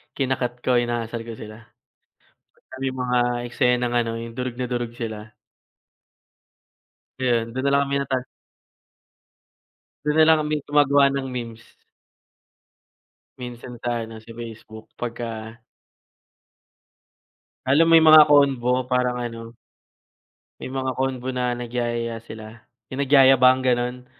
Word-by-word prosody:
kina-cut 125 -2 -2
ko, 125 -1 +3
inaasar 120 -1 -3
ko 115 - -6
sila. 110 +1 -12 0.9
Pagka - - -17
may 135 -1 -2
mga 125 -1 0 0.3
eksenang 125 -2 +1
ano, 115 -1 0
'yung 115 0 -7
durog 125 0 -5
na 125 -1 -3
durog 120 -1 -3
sila. 110 -2 -7 1.9
Ayun, 120 -3 0
do'n 130 +1 -3
na - - +2
lang 140 - +4
kami 140 0 0
natal 130 -2 -2 1.8
Do'n 150 +1 +1
na 160 - +7
lang 160 -1 +6
kami 150 0 -3
gumagawa 145 -1 +4
ng 135 -1 -3
memes. 115 -2 -7 1.8
Minsan 120 -1 -9
sa 120 -1 -2
ano, 110 0 -10
sa 115 +1 -13
Facebook, 110 -1 -10
pagka 115 -1 -6 2.0
Lalo 145 +5 +4
may 165 -1 +6
mga 155 -1 +9
convo, 130 -4 +2
parang 125 -1 0
ano, 115 -1 -7 1.1
may - - -6
mga 130 0 -2
convo 130 0 -3
na 125 -1 -1
nagyayaya 120 -1 -3
sila, 110 0 -11 0.3
'yung 140 - -2
nagyayabang, 130 -2 +5
gano'n. 125 0 -1
125 Hz, 120 wpm, -23 LUFS, 115-130 Hz, 2.0 s, mga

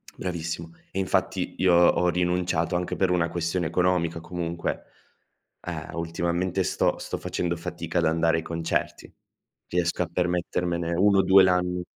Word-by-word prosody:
bravissimo. 85 -1 -4 0.2
E - - -6
infatti, 95 - -1
io 90 -2 +4
ho 90 +1 +4
rinunciato 90 -1 0
anche 90 0 -1
per 95 -2 +1
una 85 -2 +1
questione 85 0 -1
economica 90 -2 +1
comunque. 85 0 -4 0.8
Ehm, - - -6
ultimamente 85 +2 -1
sto - - +1
sto - - -4
facendo 85 -1 -2
fatica 85 0 -3
ad 85 - +1
andare 80 +1 +2
ai 80 - -3
concerti. 80 0 -3 0.5
Riesco 90 0 0
a - - -6
permettermene 85 -1 -1
1-2 95 0 +5
l'ann 90 -1 +1
85 Hz, 135 wpm, -26 LUFS, 85-90 Hz, 0.8 s, 1-2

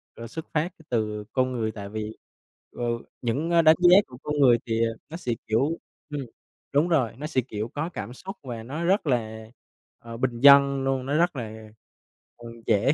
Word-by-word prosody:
rồi 115 - -8
xuất 160 +8 -7
phát 165 +3 0 0.2
từ 105 -3 -1
con 130 -1 +1
người. 110 -3 -1
Tại 100 -2 -8
vì, 110 +1 -5 0.6
ờ, - - -3 0.4
những, 140 +8 -1
ơ, 170 -1 +5
đánh 155 0 +7
giá 180 +1 +8
của 125 - -12
con 150 0 -2
người 125 -4 +6
thì, 115 0 +2
ờ, 115 - -2 0.2
nó 165 - -6
sẽ, 125 -8 -3 0.2
kiểu 135 +10 +1 0.3
ừm, 145 -1 -3 0.5
đúng 145 +4 +3
rồi, 135 -9 +2
nó 150 +3 -4
sẽ, 145 -5 +1
kiểu, 110 -3 -5
có 145 +6 -3
cảm 120 - -6
xúc 190 +9 -9
và 120 -4 -6
nó 145 +8 -5
rất 190 -1 +2
là, 110 -4 -1 0.5
ờ, 115 0 -9
bình 120 -1 -1
dân 140 -1 +7
luôn, 135 -1 0
nó 140 +3 0
rất 175 0 +2
là, 110 -3 -7 0.7
ừ, 120 - -10 0.2
dễ 115 +5 +3
130 Hz, 200 wpm, -26 LUFS, 115-150 Hz, 0.7 s, giá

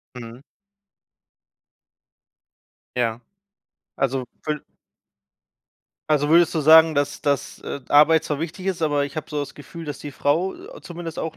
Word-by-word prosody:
Mhm. 120 +1 -10 2.5
Ja. 115 -1 0 0.8
Also, 135 -1 -1 0.2
wür 150 -1 -2 1.5
also, 145 -1 +2
würdest 170 +1 +5
du 160 - +1
sagen, 160 +1 +7
dass 145 0 -1
dass, 140 -1 -1
äh, 140 - -6
Arbeit 150 +2 +5
zwar 150 0 -3
wichtig 175 +3 -5
ist, 180 -4 -2
aber 145 -2 +1
ich 140 - -8
habe 155 +1 -5
so 150 - -2
das 140 -1 -6
Gefühl, 165 +3 -10
dass 145 -2 -6
die 145 - -7
Frau, 160 +8 0
äh, 435 +8 -12
zumindest 170 -2 -8
auch 160 - -4
150 Hz, 145 wpm, -23 LUFS, 140-165 Hz, 2.5 s, sagen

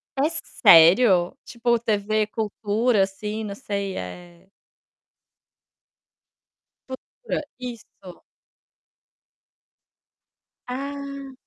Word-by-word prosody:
É 285 +4 +1
sério? 175 +5 +5
Tipo, 235 0 0
TV 215 -1 0
Cultura 215 0 0
assim, 210 +3 -5
não 200 -2 -5
sei, 200 -6 -4
eh 175 - -10 2.4
Futura, 260 - -6 0.2
isso. 230 -7 -10 2.4
Ah. 275 +1 -6
215 Hz, 65 wpm, -23 LUFS, 195-250 Hz, 2.4 s, sério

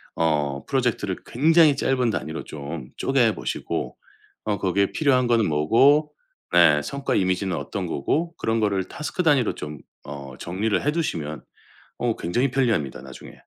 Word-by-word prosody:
어 75 -4 0
프로젝트를 120 -7 0
굉장히 155 +3 +4
짧은 125 -3 +1
단위로 80 -6 -4
좀 70 -2 -7
쪼개 125 -5 +2
보시고 - - -4 0.5
어 105 -1 -1
거기에 100 +1 +1
필요한 130 -4 +2
거는 115 -3 +3
뭐고 120 - +3 0.4
네. 80 -4 +6
성과 140 - -2
이미지는 95 0 0
어떤 95 -3 -4
거고 165 - -1
그런 115 0 0
거를 100 -3 +1
태스크 155 - -4
단위로 145 -8 +3
좀 75 -1 -7 0.2
어 70 -2 -8
정리를 100 +5 -1
해 150 - +3
두시면 80 - -3 0.5
어 120 -2 0
굉장히 120 +10 0
편리합니다, 110 - 0
나중에. 65 0 -11
105 Hz, 325 characters per minute, -24 LUFS, -, 0.5 s, 네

